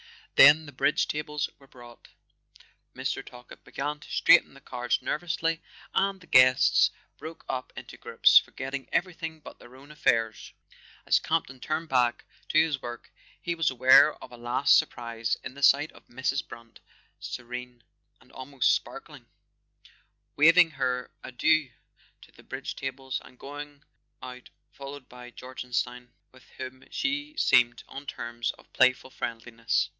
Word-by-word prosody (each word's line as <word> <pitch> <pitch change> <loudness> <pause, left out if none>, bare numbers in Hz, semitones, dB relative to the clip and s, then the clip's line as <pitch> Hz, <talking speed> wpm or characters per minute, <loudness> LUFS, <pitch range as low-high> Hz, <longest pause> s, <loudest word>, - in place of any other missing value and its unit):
Then 150 +3 +8
the 145 - -10
bridge 130 - +1
tables 150 -1 -3
were 135 - -19
brought, 120 -2 -15 0.9
Mr. - - -3
Talkett 125 0 -14
began 145 +2 -4
to - - -15
straighten - - +4
the - - -14
cards 125 -2 -2
nervously, 165 0 -2 0.3
and 195 0 +1
the 180 - -17
guests 130 -4 +5 0.3
broke 160 +1 -10
up 130 0 -4
into - - -10
groups, - - +5
forgetting 135 0 -7
everything 165 -3 -2
but - - -13
their 120 +1 -15
own 140 +3 -15
affairs. 115 -7 0 0.5
As - - +4
Campton 155 -5 -2
turned 155 +4 -3
back 125 -2 +1 0.2
to - - +1
his 155 -4 +2
work 120 -2 -8 0.3
he 175 - -3
was 165 -2 +1
aware 130 +4 +6
of 125 - -13
a 120 - -11
last 120 +3 +3
surprise 115 -1 -1
in - - -7
the 140 - -12
sight 145 +2 +4
of - - -19
Mrs. 130 +2 -2
Brant 115 0 -13 0.4
serene 125 0 -8 0.4
and 130 0 -23
almost 130 0 0
sparkling, - - -6 1.1
weaving 165 +2 +6
her 125 -3 -2
adieux 150 +3 +1 0.5
to - - -18
the - - -18
bridge - - -7
tables, 135 0 -5
and 125 - -17
going 145 +1 -9 0.4
out 125 -1 -10 0.2
followed 140 -1 -10
by 125 0 -12
Jorgenstein, 125 -1 -5 0.2
with 130 -1 -20
whom 130 0 -8
she 290 +2 -3
seemed 120 - +3
on 140 +1 -10
terms 120 -2 -4
of - - -22
playful 130 0 +2
friendliness. 115 -1 -2
130 Hz, 145 wpm, -27 LUFS, 125-150 Hz, 1.1 s, Then